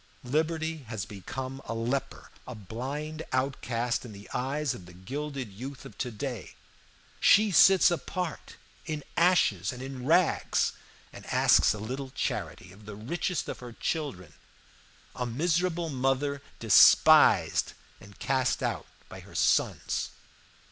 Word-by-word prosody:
Liberty 160 +4 -1
has 110 -5 -4
become 130 +7 -7
a 115 - -4
leper, 120 +4 -3 0.2
a 125 - -7
blind 135 - -5
outcast 125 -3 -1
in 120 -4 -9
the 100 0 -12
eyes 135 +2 -1
of 90 -7 -11
the 90 - -13
gilded 135 +4 -5
youth 130 +7 -8
of 135 - -11
to 125 - -2
day. 120 -1 -6 0.6
She 210 0 +5
sits 190 +2 +6
apart 175 0 -4 0.3
in 155 -2 -4
ashes 155 - +3
and 125 0 -8
in 135 -1 -7
rags, 170 +2 +2 0.4
and - - -11
asks - - +4
a - - -6
little 130 +6 -5
charity 130 -7 -4
of 105 +3 -16
the 105 - -7
richest 160 - -3
of - - -6
her 125 -1 -9
children 110 - -4 0.8
a 125 - -3
miserable 170 +6 0
mother 135 +1 -1 0.2
despised 110 -4 +6 0.3
and 100 0 -15
cast 130 -1 0
out - - -2 0.2
by - - -10
her - - -15
sons. - - +1
130 Hz, 135 wpm, -28 LUFS, 115-150 Hz, 0.8 s, sits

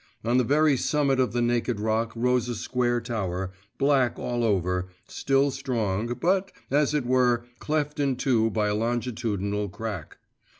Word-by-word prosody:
On 120 +2 +3
the - - +3
very 145 +2 +3
summit 140 -1 +1
of 130 - +2
the 120 0 0
naked 120 -1 0
rock 110 +2 0
rose 125 0 +1
a 120 - -2
square 120 +1 0
tower, 95 -6 -3 0.3
black 135 -3 +2
all 120 -1 -2
over, 90 -4 0 0.2
still 135 +1 +1
strong, 120 -4 -2
but, 190 +2 +1 0.2
as 150 +1 +2
it 145 -4 0
were, 125 -1 +2
cleft 150 -1 -1
in 140 -2 +1
two 120 -3 +2
by 105 -1 0
a - - 0
longitudinal 110 -3 -1
crack. 100 -4 -6
120 Hz, 160 wpm, -26 LUFS, 110-135 Hz, 0.3 s, On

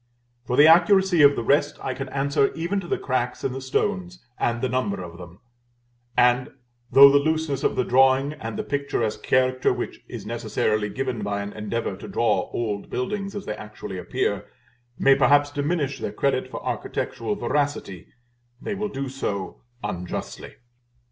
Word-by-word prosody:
For 125 - -1
the 145 - +8
accuracy 175 +1 +5
of 145 0 +7
the 120 - -2
rest 140 +5 +2
I 130 - -3
can 135 0 -6
answer, 140 +1 +1
even 170 +5 -1
to 180 - -7
the - - 0
cracks 125 -2 -2
in - - 0
the 135 - -5
stones, 180 +7 -1 0.2
and 120 0 0
the 130 - 0
number 115 -6 -1
of 85 0 -10
them; 90 +3 -12 0.8
and 125 +1 +4 0.4
though 140 +2 +9
the 145 - +5
looseness 155 -2 -1
of - - +1
the 125 - +1
drawing, 135 +3 +3
and 115 -6 -6
the - - -2
picturesque 140 -6 -2
character 130 0 +2
which - - -4
is - - -8
necessarily 105 -1 -1
given 125 +1 -3
by 100 0 -2
an 100 - -7
endeavor 110 +2 -3
to - - -9
draw - - 0
old 105 -4 -3
buildings 195 +10 -3
as 205 - -5
they 105 - -3
actually 105 -3 -8
appear, - - -2 0.5
may 135 - +5
perhaps 145 +1 +4
diminish 145 -1 -1
their - - -3
credit 135 -2 0
for - - -7
architectural 110 -2 -3
veracity, 140 - -2 0.5
they 215 - -4
will 210 +1 -3
do 135 -3 -4
so 100 -8 -4 0.2
unjustly. 90 0 -5
130 Hz, 170 wpm, -24 LUFS, 115-145 Hz, 0.8 s, though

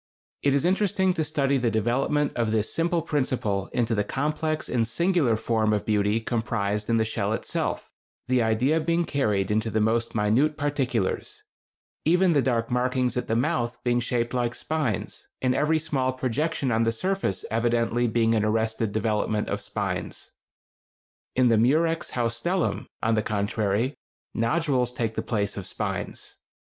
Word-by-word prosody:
It 140 -1 +2
is 140 - +1
interesting 190 0 +2
to 160 - -1
study 140 -3 +1
the 125 -2 +1
development 125 +7 +1
of 115 -2 0
this 110 -1 0
simple 165 0 +1
principle 125 - -1
into 115 -1 0
the 105 -2 +1
complex 155 +6 -2
and 115 -2 0
singular 170 -2 +2
form 110 -1 +1
of 105 - -1
beauty 105 0 +2
comprised 110 -3 -2
in 115 - +3
the 110 - +2
shell 110 -1 -1
itself, - - -2 0.4
the 130 -1 +3
idea 120 +8 +2
being 170 +2 +1
carried 105 - 0
into 110 +1 +1
the 110 - 0
most 115 +2 +1
minute 115 +9 +2
particulars—even 145 - -1
the 145 - +4
dark 120 -2 0
markings 125 0 +1
at 125 - -2
the 110 - 0
mouth 120 -2 0
being 120 0 +2
shaped 120 0 -1
like 120 -1 0
spines, 150 -10 -3
and 130 -1 +1
every 150 +4 +2
small 140 -5 0
projection 135 +2 -1
on 110 0 +2
the 115 0 +2
surface 185 - -1
evidently 120 +1 +1
being 115 0 +2
an 110 -2 +2
arrested 110 0 0
development 105 0 0
of - - -2
spines. - - -4 1.0
In 130 -1 +4
the 115 -2 +4
Murex 160 +7 +2
haustellum, 125 +10 -1 0.2
on 115 - +2
the 110 - +2
contrary, 105 +4 0 0.4
nodules 125 0 +1
take 115 -2 -2
the - - -2
place 105 -3 -2
of 95 - -5
spines. - - -5
120 Hz, 155 wpm, -26 LUFS, 110-145 Hz, 1.0 s, the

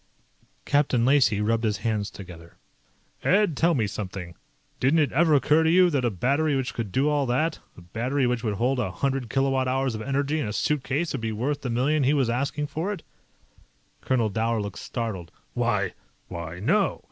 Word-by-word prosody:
Captain 140 -5 +2
Lacey 130 -6 +3
rubbed 115 +2 +1
his 105 -2 0
hands 105 -3 0
together. 85 -3 -12 0.7
"Ed, 200 -4 +3
tell 170 +4 +2
me 115 -5 +1
something. 95 -4 -6 0.5
Didn't 135 +6 +3
it 150 -3 +2
ever 160 +2 +4
occur 150 +3 +4
to 160 - +2
you 180 +1 +5
that 140 -4 0
a 120 - +2
battery 140 - +1
which 130 -2 -2
would 110 -5 -4
do 135 +8 +1
all 145 -2 +1
that 155 +7 0 0.2
a - - -11
battery 125 +10 -1
which 125 -1 -1
would 105 -3 -1
hold 125 +5 0
a 115 - -1
hundred 135 +4 -2
kilowatt 135 0 +1
hours 130 0 0
of 110 - -5
energy 140 +4 -1
in 135 - -2
a 105 - -4
suitcase 150 +5 -1
would 135 - -3
be 110 -1 -2
worth 130 +7 -2
the 125 - -3
million 135 +6 +1
he 140 +3 +3
was 130 -5 +1
asking 140 +4 -1
for 160 +7 -3
it?" 205 - -6 1.0
Colonel 120 -4 +1
Dower 115 +2 0
looked 100 -2 -5
startled. 105 -8 -5 0.2
"Why... - - 0 0.4
why, 85 0 -6
no. 190 - +1
130 Hz, 195 wpm, -25 LUFS, 110-145 Hz, 1.0 s, you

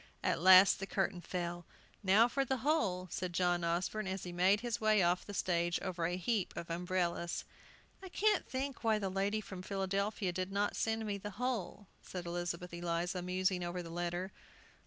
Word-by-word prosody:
At - - +1
last 185 +1 +8
the 195 - -4
curtain 190 -3 -1
fell. 175 -1 -4 0.4
"Now 205 +4 +5
for 275 +3 0
the 265 0 -1
whole," 190 - +1
said 180 -1 -3
John 175 0 +1
Osborne, 180 +5 -1
as 190 0 -3
he 180 - -5
made 185 +4 +3
his 235 -1 -3
way 215 -3 +4
off 175 +1 +2
the 205 - -6
stage 175 -1 +1
over 175 -3 -2
a 175 +1 -2
heap 200 +2 -1
of 170 0 -5
umbrellas. 175 0 -1 0.6
"I 380 - -8
can't 420 +2 +2
think 270 0 -3
why 220 -1 +3
the 195 -3 -2
lady 200 +3 0
from 190 -3 -8
Philadelphia 195 +1 -1
did 185 +2 -3
not 200 +1 0
send 225 0 -1
me 200 -1 -2
the 205 - -5
whole," 230 -5 -2 0.2
said 180 -2 -7
Elizabeth 175 0 -4
Eliza, 175 +1 -2
musing 185 0 0
over 175 +1 -3
the 165 - -8
letter. 175 +2 -3
185 Hz, 185 wpm, -34 LUFS, 175-210 Hz, 0.6 s, last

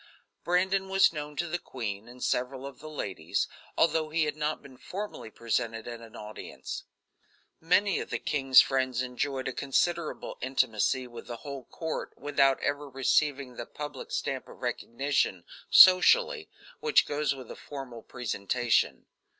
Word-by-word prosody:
Brandon 190 +2 +1
was 195 -2 +5
known 150 -1 -5
to 170 - -1
the 175 +2 -2
queen 110 -8 -5
and 125 +1 -10
several 130 +2 -1
of 140 - -9
the 155 - -9
ladies, 95 - -2 0.3
although 160 -1 +3
he 160 +1 +2
had 150 -1 -1
not 150 0 -2
been 135 -2 -13
formally 200 - -6
presented 115 0 -2
at 120 -1 -6
an 115 -1 -13
audience. 105 0 -7 0.7
Many 185 +4 +3
of - - -5
the - - -1
king's 135 -3 +5
friends 130 -2 0
enjoyed 130 +1 -2
a 130 - -2
considerable 170 +5 -1
intimacy 130 0 +1
with 120 -1 -10
the 120 -1 -5
whole 140 -3 -6
court 160 -1 -5
without 140 -2 +2
ever 145 0 -2
receiving 135 0 +1
the 120 - -5
public 145 -2 -7
stamp 135 -1 -2
of - - -13
recognition, 120 -5 -1 0.3
socially, 425 - +7 0.3
which 455 -2 +4
goes 145 -1 0
with 130 -2 -10
a - - -7
formal 135 -5 -8
presentation. 120 0 0
135 Hz, 150 wpm, -29 LUFS, 125-155 Hz, 0.7 s, socially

